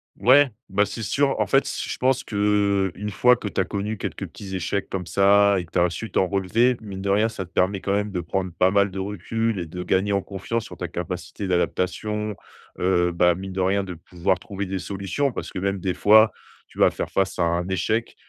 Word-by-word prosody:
Ouais, 135 +2 +5 0.2
bah, 100 +2 +2
c'est 115 - -6
sûr. 140 +5 +1
En - - +2
fait, 135 - +3
s - - -3
je - - -4
pense 130 0 +2
qu'une 100 -1 0
fois 125 +5 +5
que 110 - -6
tu 95 - -1
as - - 0
connu 105 +1 -3
quelques - - -4
petits 95 -2 -8
échecs 95 +2 -2
comme 90 -2 -4
ça 100 +1 +4
et 90 - -5
que 85 - -24
tu - - +1
as 90 0 +3
su 115 +6 -5
t'en 95 - +1
relever, 100 +6 +2
mine 100 -3 -7
de 100 - -1
rien, 105 +3 +3
ça 95 -4 -6
te 85 - -23
permet 95 +1 +1
quand 100 - -1
même 105 +1 0
de 90 -3 -3
prendre 90 +2 -2
pas 90 +3 +2
mal 100 0 +3
de 95 - -9
recul 105 +2 -2
et 85 - -4
de 90 +3 -6
gagner 95 +3 +1
en 100 - +1
confiance 105 +4 -4
sur - - -10
ta - - -4
capacité 100 - -5
d'adaptation, 100 +4 -1 0.4
heu, 90 -1 +2
bah, 85 0 +3
mine 95 +1 -7
de 95 - -1
rien 100 +2 +1
de 90 -2 -6
pouvoir 90 +3 -2
trouver 100 +2 -5
des 95 0 -3
solutions. 100 +9 -2
Parce - - -6
que - - -4
même 100 0 -1
des 90 0 -1
fois, 110 +1 +6 0.4
tu - - -15
vas - - +6
faire - - -5
face 95 -1 0
à 85 - +2
un 85 +1 0
échec 110 +5 -1
100 Hz, 235 wpm, -23 LUFS, 90-105 Hz, 0.4 s, fois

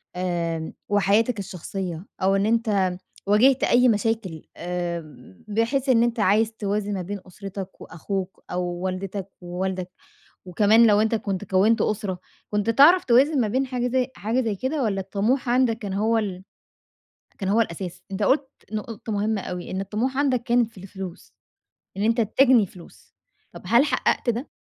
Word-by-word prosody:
آآ، 170 -3 -2 0.2
وحياتك 205 +3 +2
الشخصية 180 -2 -5 0.2
أو 190 +1 +3
إن 195 +1 +1
أنت 210 -5 +1 0.3
واجِهت 245 +6 +4
أي 250 +1 +5
مشاكل 210 -6 -1
آآ، 170 - -6
بحيث 230 +6 0
إن 235 -2 +5
أنت 235 0 -1
عايز 215 +2 +3
توازن 205 -1 -2
ما 190 - -2
بين 200 +3 -5
أُسرتك 195 0 -8
وأخوك 190 +3 -5
أو 180 0 -1
والدتك 185 +2 -4
ووالدك، 180 +1 -3 0.6
وكمان 215 +5 +5
لو 210 0 +5
أنت 220 +1 +1
كنت 200 -2 -3
كوّنت 200 +4 +3
أسرة، 205 -4 -1 0.3
كنت 210 +1 0
تعرَف 295 +10 +6
توازن 265 +3 +4
ما 220 - +1
بين 260 +6 0
حاجة 250 -1 -1
زي 255 0 +1
حاجة 230 +5 0
زي 225 -4 -1
كده؟ 265 +7 -2
والّا 195 -4 0
الطموح 215 +7 -1
عَندك 245 -2 +3
كان 200 -4 -5
هو 220 +3 +1
ال 190 -4 -3 1.0
كان 195 - -3
هو 215 +4 +3
الأساس؟ 180 -3 -3
أنت 195 - -3
قُلت 265 +6 +2 0.2
نُقطة 215 0 -5
مهمة 205 0 0
أوي، 180 0 -6
إن 190 - -2
الطموح 220 +7 -2
عَندك 265 -4 +2
كانت 240 -2 +2
في 210 - -15
الفلوس، 190 -2 -9 0.6
إن 200 - -2
أنت 230 +2 +2
تجني 235 0 +4
فلوس، 175 -1 -16 0.4
طَب - - -11
هل 240 +5 +5
حقّقت 265 -4 +1
ده؟ 240 +5 -4
205 Hz, 160 wpm, -24 LUFS, 190-230 Hz, 1.0 s, تعرَف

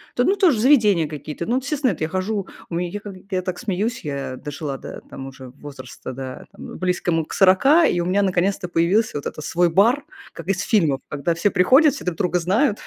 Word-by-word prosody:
То 245 - +2
ну 395 - +3
тоже 345 - +3
заведения 210 - +4
какие-то, 150 +2 -6
ну 245 +2 0
естественно, 275 -2 0
эт 160 - -8
я 155 - -1
хожу. 190 +2 -2 0.2
У 170 - -4
меня, 175 0 -2
я 205 +3 -5
как, 205 -1 -9 0.2
я 185 -1 0
так 180 -1 -4
смеюсь, 215 +2 -2
я 140 -3 -4
дожила 145 -1 -5
до - - -9
там 135 - -8
уже 130 -1 -11
возраста, 130 -2 -10
да 130 0 -7
там, - - -11
э, - - -8
близкому 175 -3 -1
к - - -9
40, 270 - +5
и 175 - +1
у - - -2
меня 195 +3 +2
наконец-то 185 0 0
появился 175 +3 +1
вот 145 - -7
этот 155 - -5
свой 175 0 +2
бар, 230 - +3 0.3
как - - -10
из 190 -1 0
фильмов. 160 - +2
Когда 150 +4 -1
все 190 +5 +1
приходят, 260 - +5
все - - -8
друг 180 -3 -2
друга 180 -2 0
знают, 210 - +1
180 Hz, 225 wpm, -21 LUFS, 155-215 Hz, 0.3 s, 40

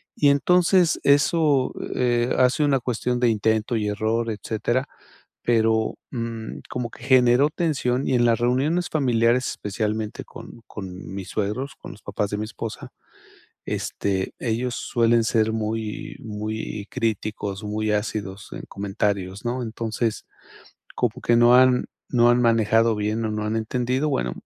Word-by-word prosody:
Y 145 - +4
entonces 180 +4 +3
eso, 145 -1 +3 0.2
eh, 120 -1 +1
hace 130 +4 +3
una 140 -2 +3
cuestión 125 0 -1
de 125 - +3
intento 110 +1 +1
y 105 -2 0
error, 110 +2 -1
etcétera, 115 +5 -2 0.5
pero, 110 -1 +2 0.2
mm, 115 -2 -5
como 125 -2 -3
que 120 - -14
generó 130 +1 +5
tensión, 140 -6 0
y - - +1
en 120 -1 +3
las 115 -1 +3
reuniones 140 +9 +1
familiares, 125 -3 +2
especialmente 105 +1 -3
con 115 - -12
con 95 -2 -8
mis 95 -1 -6
suegros, 120 +7 -3
con - - -10
los 100 - -16
papás 100 0 -2
de 105 - -2
mi 105 - -2
esposa, 110 0 -7 0.8
este, 95 -2 -2
ellos 120 +1 -1
suelen 115 -1 +2
ser 110 -1 +2
muy, 110 -1 -3
muy 105 -1 -5
críticos, 110 -3 -2
muy 105 +1 -1
ácidos 105 -2 -3
en - - -6
comentarios, 100 -1 -2
¿no? 125 +2 -2
Entonces, 115 0 -2 0.7
como 125 +1 -1
que 120 - +3
no 120 +1 +6
han 125 0 +5 0.2
no 120 -1 +4
han 120 +1 +3
manejado 115 -1 +3
bien 105 +2 -1
o - - -2
no 105 0 -2
han 110 +1 -1
entendido, 125 +5 -1
bueno, - - -1
115 Hz, 145 wpm, -24 LUFS, 105-125 Hz, 0.8 s, no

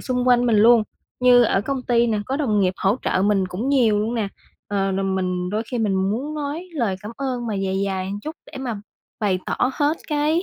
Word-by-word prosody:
xung 250 -1 -1
quanh 245 0 +4
mình 225 -2 +3
luôn. 225 +1 +6 0.4
Như 250 -1 +6
ở 195 -4 +2
công 265 +3 -3
ty 240 -1 +2
nè, 220 -2 0
có 265 - -1
đồng 220 -9 +1
nghiệp 185 -1 +1
hỗ 200 +5 +1
trợ 185 - +1
mình 195 -2 +2
cũng 210 +9 -3
nhiều 235 -7 +3
luôn 220 +3 -1
nè, 215 -4 -1 0.4
ờ, 195 -1 0
rồi 195 +1 -1
mình 180 -1 -1
đôi 215 +2 -1
khi 245 - -2
mình 210 -3 +1
muốn 220 +11 -1
nói 300 +4 -4
lời 230 - -1
cảm 215 +2 -7
ơn 255 -3 -3
mà 220 - -2
dài 195 0 -1
dài 190 -1 -2
một 200 +2 -5
chút 310 +8 -7 0.2
để - - -7
mà 240 -6 -4 0.4
bày 195 -4 +1
tỏ - - -2 0.2
hết 295 +4 +1
cái, 305 +3 +1
225 Hz, 235 wpm, -22 LUFS, 195-255 Hz, 0.4 s, luôn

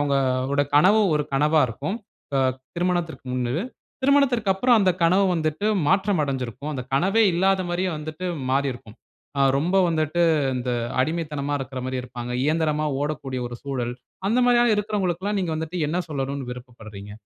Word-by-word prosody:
அவங்க 145 -1 +1 0.4
உட 145 - +3
கனவு, 195 +8 +6 0.2
ஒரு 150 - +1
கனவா 150 +3 +3
இருக்கும். 145 - -4 0.4
அ, - - +3 0.4
திருமணத்திற்கு 175 -4 -1
முன்னது. 125 +7 -1 0.4
திருமணத்திற்கு 260 -7 +3
அப்புறம், 240 +4 +4
அந்த 190 -2 +4
கனவு 185 +4 +4
வந்துட்டு 155 +3 -1 0.2
மாற்றம் 190 -3 +2
அடஞ்சுருக்கும். 135 +2 -4
அந்த 130 - -3
கனவே 195 +10 +3
இல்லாத 190 +2 +2
மாரியே 180 +2 0
வந்துட்டு 155 +4 -6 0.2
மாறியிருக்கும். 130 -5 -2 0.4
ஆ - - +2 0.2
ரொம்ப 170 +7 +1
வந்துட்டு, 160 +1 0 0.3
இந்த 125 0 -2 0.3
அடிமைத்தனமா 150 -1 -1
இருக்குற 130 -1 -5
மாரி 130 0 -2
இருப்பாங்க. 125 -1 -6
இயந்திரமா 155 0 +1
ஓடக்கூடிய 145 -3 -3
ஒரு 120 - -7
சூழல். 125 -4 -3 0.4
அந்த 230 +4 +2
மாரியான 240 -1 +4
இருக்குறவங்களுக்குலாம் 205 -1 -1
நீங்க 175 -3 -2
வந்துட்டு, 160 +3 -4
என்ன 170 +4 -1
சொல்லணுனு 135 -3 -3
விருப்பப்படுறீங்க? 110 -5 -10
155 Hz, 145 wpm, -24 LUFS, 135-185 Hz, 0.4 s, கனவு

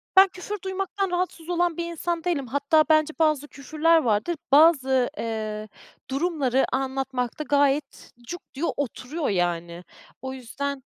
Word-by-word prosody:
ben 385 +1 +9
küfür 370 +3 -6
duymaktan 385 0 -2
rahatsız 355 -2 -2
olan 350 -1 +1
bir 340 - -2
insan 340 0 -3
değilim, 315 -7 -1
hatta 285 +5 +3
bence 310 0 +4
bazı 305 -3 +2
küfürler 310 +4 +2
vardır, 235 +3 +1 0.2
bazı, 270 -4 +5
eee, 215 -1 -4 0.4
durumları 275 -3 +1
anlatmakta 265 0 -2
gayet 285 0 0 0.2
cuk 350 +5 -6
diyor, 300 +5 -1
oturuyor, 285 +3 -3
yani. 175 -2 -1 0.4
O 265 0 -5
yüzden 270 +2 -5
285 Hz, 130 wpm, -25 LUFS, 260-335 Hz, 0.4 s, ben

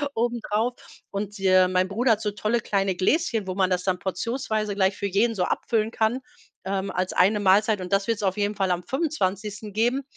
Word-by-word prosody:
obendrauf. 235 0 0 0.4
Und, 205 +1 -4
äh, 185 -1 +5
mein 185 0 +1
Bruder 235 +5 +1
hat 215 - -3
so 210 -2 -1
tolle 215 +3 -1
kleine 195 -3 0
Gläschen, 225 - +1
wo 185 - -3
man 190 -1 +2
das 180 -1 0
dann 185 -2 0
portionsweise 215 +2 -2
gleich 190 0 +2
für 200 - -3
jeden 215 +4 +1
so 180 - 0
abfüllen 220 +3 0
kann, 230 +4 0 0.4
ähm, 195 0 -2
als 185 +1 -2
eine 200 +4 +3
Mahlzeit. 205 +1 +3
Und 180 - -7
das 195 0 +2
wird's 225 -3 -1
auf 190 0 0
jeden 205 0 0
Fall 195 -2 0
am 180 0 -1
25. 210 - -2
geben. 240 +6 +1
205 Hz, 200 wpm, -25 LUFS, 190-225 Hz, 0.4 s, äh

